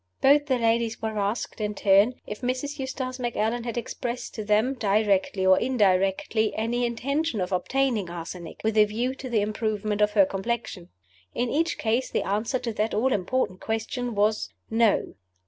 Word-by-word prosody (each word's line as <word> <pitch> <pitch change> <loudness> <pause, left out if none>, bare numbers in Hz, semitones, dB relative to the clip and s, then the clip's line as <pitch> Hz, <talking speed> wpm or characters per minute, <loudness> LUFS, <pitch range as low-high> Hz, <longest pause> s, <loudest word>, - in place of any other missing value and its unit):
Both 290 +2 +5
the 260 -3 +2
ladies 230 -1 +1
were 220 -1 -3
asked, 205 +2 -2
in 210 0 -2
turn, 200 +5 +4
if 210 - -7
Mrs. 260 +4 -2
Eustace 260 -1 -4
Macallan 235 -1 -1
had 235 -1 -4
expressed 240 +1 -4
to 215 - -5
them, 215 +5 +2
directly 200 -4 +1
or 190 0 +6
indirectly, 210 -2 +1
any 240 +2 0
intention 275 +2 -1
of 180 +1 -2
obtaining 230 0 0
arsenic, 170 0 -7
with 220 0 +2
a 210 - +7
view 235 +5 -2
to 265 -1 -8
the 225 -3 +2
improvement 210 0 -1
of 210 0 +3
her 200 -3 +6
complexion. 195 -2 -4 0.5
In 245 0 0
each 330 +3 0
case 230 +4 0
the - - -1
answer 215 +6 -1
to 245 -2 -4
that 215 +1 -1
all 255 +5 +2
important 190 0 -1
question 230 +2 -3
was, 210 +1 +1 0.2
No. 225 -2 +2
220 Hz, 170 wpm, -26 LUFS, 205-245 Hz, 0.5 s, a